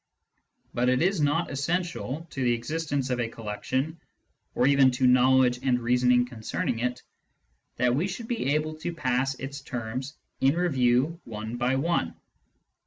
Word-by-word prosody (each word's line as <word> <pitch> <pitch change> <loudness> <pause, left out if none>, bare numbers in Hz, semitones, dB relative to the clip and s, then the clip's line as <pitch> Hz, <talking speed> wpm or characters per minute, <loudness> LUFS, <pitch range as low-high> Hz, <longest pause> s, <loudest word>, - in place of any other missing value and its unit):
But 125 +1 +1
it 130 0 +2
is 190 -2 +1
not 150 +4 +1
essential 165 0 -2
to 135 - -4
the 120 -1 +3
existence 145 +2 -2
of 125 - 0
a 120 - 0
collection, 130 +8 -3 0.5
or 125 - +3
even 140 -1 +5
to 130 +1 +1
knowledge 125 0 +4
and 125 -2 +2
reasoning 125 +1 +3
concerning 120 +3 -3
it, 125 +1 -2 0.7
that 125 -1 +2
we 155 +9 +1
should 225 +4 -6
be 150 - 0
able 155 +1 -1
to 170 +2 -5
pass 130 -2 0
its 140 +1 -6
terms 130 +2 -5 0.2
in 135 +3 +3
review 145 -1 +1
one 110 +1 -6
by 125 +2 +1
one. 140 - 0
130 Hz, 155 wpm, -27 LUFS, 125-155 Hz, 0.7 s, even